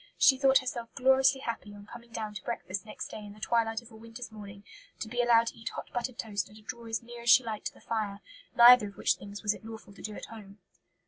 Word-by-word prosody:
She 270 - +6
thought 270 0 +5
herself 240 -3 -3
gloriously 265 +1 +4
happy, 225 -4 -5
on 205 0 -12
coming 235 +1 -12
down 215 -2 -4
to 200 - -8
breakfast 205 -3 -4
next - - -6
day 215 - -8
in 205 -1 -9
the 215 - -16
twilight 225 0 0
of 235 - -16
a - - -13
winter's 230 +1 -9
morning, 200 -2 -10 0.4
to - - -4
be 245 +2 0
allowed 235 -1 +5
to - - -14
eat 225 - -4
hot - - -8
buttered 245 0 -3
toast 205 -3 -3
and 210 - -16
to 215 - -16
draw 235 +1 -8
as 225 0 -3
near 240 0 -10
as 235 - -1
she 255 - +8
liked 220 -2 -4
to - - -7
the - - -18
fire; 210 -3 -3 0.4
neither 240 -2 +9
of 200 - -12
which - - +3
things 200 +1 -10
was 210 -1 +2
it - - -12
lawful 220 -2 -10
to - - -14
do 215 -1 -6
at - - -7
home. 205 -3 -12
225 Hz, 265 wpm, -30 LUFS, 210-240 Hz, 0.4 s, neither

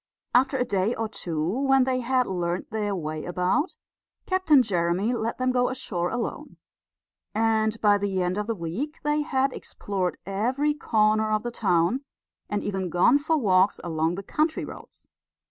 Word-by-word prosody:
After 265 +2 +3
a 250 - +1
day 200 +2 0
or 225 - -2
two, 165 -7 -3
when 270 +6 +3
they 255 0 0
had 255 +1 +1
learned 175 -2 -2
their 210 -2 -1
way 155 -3 -4
about, 180 - 0 0.5
Captain 325 -8 +4
Jeremy 185 +2 0
let 230 -1 -2
them 255 0 +1
go 250 -1 +2
ashore 180 -9 -2
alone; 240 -2 -4 0.8
and 220 0 +1
by 205 -1 +4
the 195 -2 -1
end 180 +3 -1
of 210 - -3
the 230 - -1
week 205 - -4
they 295 0 +1
had 270 -2 0
explored 190 -3 -3
every 250 +10 0
corner 215 -6 +2
of 215 0 +1
the 240 - -3
town, 190 +4 +1 0.5
and 205 - -1
even 190 -3 -2
gone 180 - +4
for 315 +2 +1
walks 190 -6 +3
along 165 0 0
the 195 - -6
country 310 - 0
roads. - - -12
215 Hz, 165 wpm, -26 LUFS, 185-255 Hz, 0.8 s, Captain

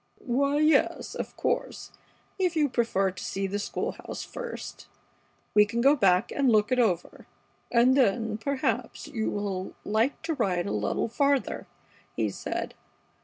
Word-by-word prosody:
"Why, 280 +3 +1
yes, 310 +1 +2
of - - -6
course, - - -2 0.5
if 360 -3 +1
you 300 -2 +3
prefer 225 -6 +1
to 185 0 -9
see 195 0 -2
the 200 +1 -2
school 205 - -2
house - - -7
first, 485 -1 -7 0.7
we 210 - +7
can 225 +3 -3
go 275 +4 +5
back 195 -4 +3
and 275 -3 +2
look 210 0 +3
it 255 - +3
over, 185 -8 0 0.4
and 245 +2 +5
then, 225 -4 +2
perhaps, 275 +3 -2
you 220 -2 -2
will 195 -2 -3
like 220 +6 +1
to 325 0 -1
ride 190 - 0
a - - -3
little 105 - -1
farther," 280 +3 0 0.5
he - - 0
said. - - -4
235 Hz, 155 wpm, -27 LUFS, 200-280 Hz, 0.7 s, we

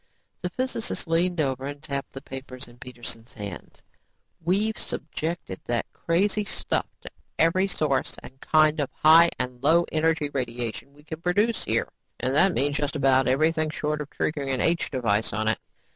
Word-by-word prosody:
The 180 - -2
physicist 255 -3 -3
leaned 170 +1 +1
over 135 -3 0
and 145 0 -6
tapped 140 -2 -4
the 135 - -8
papers 130 -1 -7
in 120 0 -17
Peterson's 120 -2 -7
hands. 100 -4 -8 0.6
"We've 205 +6 +1
subjected 160 - -4
that 120 -1 0
crazy 200 +5 +1
stuff 205 - -1
to - - -9 0.3
every 185 +4 +3
source 145 -8 0
and 135 +1 -13
kind 155 0 +4
of 140 - 0
high 165 +2 +7
and 125 -1 -4
low 165 +5 +4
energy 155 -2 +1
radiation 125 0 -3
we 145 +1 -19
can 160 +1 -7
produce 205 +6 +1
here - - +1 0.3
and 130 - 0
that 180 +5 +5
means 145 +1 +1
just 145 +1 -2
about 135 -2 +4
everything 155 +4 +2
short 150 0 -2
of 145 - -6
triggering 140 -3 -2
an 130 - 0
H 170 +4 +2
device 115 -6 0
on 110 +2 -1
it. 110 - +2
150 Hz, 170 wpm, -26 LUFS, 130-165 Hz, 0.6 s, high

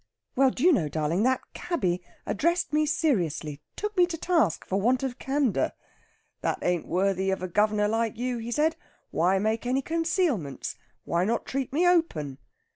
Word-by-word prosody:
Well, 270 +1 +5
do 255 - -4
you 360 0 +7
know, 160 - +1
darling, 155 +5 0
that 260 0 +2
cabby 185 - -1 0.2
addressed 335 - 0
me 305 0 +3
seriously; 175 - 0
took 420 0 -4
me 355 -2 +5
to 340 -2 -4
task 330 - +1
for 195 +1 -1
want 250 +4 +2
of 265 -1 -3
candour. 265 - 0 0.7
'That - - 0
ain't 175 -2 0
worthy 190 +1 +1
of 190 -1 -1
a - - -1
guv'nor 210 +3 +2
like 225 0 0
you,' 245 0 -2
he 230 +1 -5
said. 305 +6 +2 0.4
'Why 180 +4 +2
make 220 +4 0
any 265 +2 +1
concealments? 325 - -1 0.3
Why 170 +1 0
not 225 +4 0
treat 270 -1 -3
me 335 +6 +3
open?' 160 - +1
235 Hz, 175 wpm, -27 LUFS, 185-305 Hz, 0.7 s, you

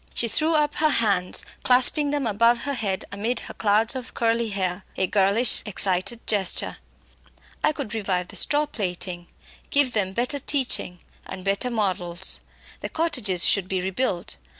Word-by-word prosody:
She 235 - +2
threw 315 +8 +3
up 295 -1 +1
her 310 0 +3
hands, 200 -9 +1 0.2
clasping 260 +4 +4
them 290 -2 -1
above 230 +2 +2
her 285 - -2
head 205 -7 -1
amid 225 +4 -2
her - - -8
clouds 220 +4 +1
of 255 -1 -7
curly 230 0 0
hair 190 -2 -3
a 190 - +1
girlish 200 +5 +3
excited 200 +2 +2
gesture. 200 -4 +1 0.9
"I - - +4
could 270 -7 -6
revive 190 -5 -2
the - - -11
straw 295 +1 +3
plaiting; 180 -8 -5 0.4
give 280 -3 +2
them 190 -3 -1
better 250 +6 -1
teaching 255 -11 -1 0.3
and 185 - -8
better 200 +5 0
models. 185 -5 -1 0.4
The - - -6
cottages 250 - +1
should 195 -3 +1
be 190 0 -2
rebuilt. 185 - -2
215 Hz, 155 wpm, -23 LUFS, 190-255 Hz, 0.9 s, clasping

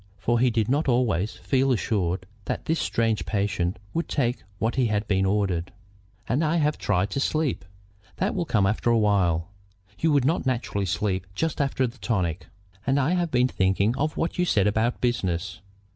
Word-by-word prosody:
For 120 +4 +1
he 125 +1 +4
did 110 -2 0
not 145 +4 +1
always 115 -6 +1
feel 135 0 +1
assured 95 -6 0 0.2
that - - -3
this 160 +1 0
strange 115 -2 0
patient 100 -4 -1 0.2
would 165 -1 -2
take 125 -3 0 0.2
what 110 +4 -1
had 110 -5 +1
been 95 -1 +2
ordered. 95 -4 0 0.6
"And 135 +7 +1
I 155 +1 +1
have 150 -2 +1
tried 100 0 0
to - - -1
sleep." 155 -1 0 0.5
"That 190 +3 0
will 175 -3 -1
come 105 -9 +2
after 105 +4 +1
a 115 - +4
while. 95 -6 +2 0.5
You 160 - +2
would 140 -3 +3
not 160 +5 +1
naturally 120 -6 -1
sleep 95 0 -1
just 160 +2 -1
after 135 -1 +1
the 125 +1 -7
tonic." 90 -7 -1 0.4
"And 135 +1 +3
I 140 +4 +1
have 175 -2 +1
been 125 -2 +3
thinking 100 +1 +1
of 155 +3 -1
what 165 - -2
you - - +4
said 100 - +2
about 110 +3 +1
business. 90 -7 -1
115 Hz, 185 wpm, -25 LUFS, 95-135 Hz, 0.6 s, he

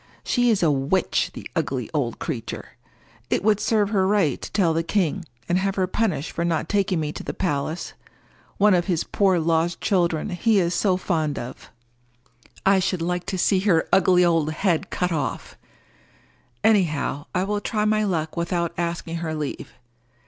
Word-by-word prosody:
She 245 -1 +2
is 210 -5 +2
a 160 - +4
witch, 140 +7 +1
the - - -7
ugly 135 -8 -1
old 135 -6 -1
creature! 120 -9 -5 0.6
It - - 0
would 210 -1 +3
serve 210 -2 +1
her 190 -3 +2
right 195 -9 +1
to - - -7
tell 180 -6 +2
the 165 - +1
king 180 0 -1 0.2
and 175 +1 +2
have 195 0 -1
her 190 - +1
punished 185 -5 -1
for 170 - -2
not 165 -2 0
taking 195 -3 +1
me 150 -1 -2
to - - -7
the - - -5
palace—one 180 +5 -2
of 175 -1 +2
his 175 -4 +1
poor 195 -3 +2
lost 165 +1 +1
children 175 -2 0
he 210 +4 +2
is 175 -1 +1
so 185 -2 +2
fond 160 -5 -1
of! 120 +1 -8 1.0
I 195 0 +5
should 185 -2 -1
like 180 +1 -2
to 195 -1 -2
see 190 +1 +3
her 185 -5 +2
ugly 185 -2 +5
old 165 -3 +2
head 175 -1 0
cut 180 0 -1
off. 150 -5 -3 1.1
Anyhow 155 -8 +1
I 180 - +2
will 205 +1 -1
try 210 0 -1
my 215 0 +2
luck 160 -6 -1
without 170 0 -1
asking 170 -1 -3
her 160 -1 -3
leave. 150 -2 -5
175 Hz, 175 wpm, -23 LUFS, 160-195 Hz, 1.1 s, I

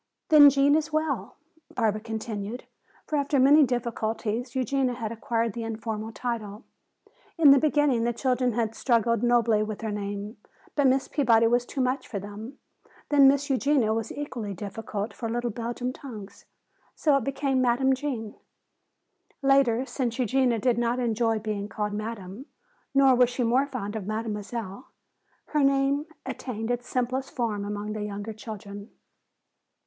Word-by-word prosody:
"Then 295 -3 +9
Gene 280 +1 +3
is 315 +1 +1
well?" 310 0 -2 0.4
Barbara 215 -3 +1
continued. 220 0 -5 0.4
For 305 - -1
after 280 0 +1
many 290 +4 +7
difficulties 235 -1 -2
Eugenia 260 0 0
had 225 -3 -4
acquired 230 -1 -1
this 230 - -5
informal 220 -1 -4
title. 225 -2 -5 0.7
In 305 -4 +7
the 275 - +7
beginning 295 -5 +2
the 240 - +1
children 250 0 0
had 225 -1 -1
struggled 230 -2 +1
nobly 235 -3 +3
with 215 -1 -4
her 220 -1 -3
name, 205 +1 -5 0.4
but 285 -2 +3
Miss 265 +1 +2
Peabody 230 -6 +3
was 240 +1 +2
too 275 - -3
much 255 +1 -1
for 210 - -5
them. 205 +7 -8 0.5
Then 280 -2 +6
"Miss 280 +1 +3
Eugenia" 265 -4 +2
was 225 -1 -3
equally 240 -8 -5
difficult 205 +2 -5
for 230 - -5
little 240 +1 -2
Belgian 240 +3 -4
tongues, 215 -9 -10 0.5
so 295 -3 +3
it 275 - -2
became 270 0 0
Madame 255 +2 +3
Gene. 255 -6 -4 1.1
Later, 270 -3 +3
since 245 -4 -3
Eugenia 255 -1 +2
did 235 +2 +1
not 240 +1 0
enjoy 230 -2 +1
being 210 -1 -4
called 210 -1 -3
Madame, 215 +2 -6 0.5
nor 270 -1 +6
was 250 -1 +4
she 250 0 -2
more 250 +4 +2
fond 225 -6 -5
of 205 -3 -5
Mademoiselle, 215 0 -4 0.6
her 300 -2 +1
name 275 +2 +2 0.2
attained 225 -2 -4
its 245 0 -3
simplest 255 +1 -1
form 220 -5 -2
among 205 +1 -4
the 215 - -4
younger 205 +1 -5
children. 205 -1 -9
235 Hz, 155 wpm, -26 LUFS, 215-265 Hz, 1.1 s, Then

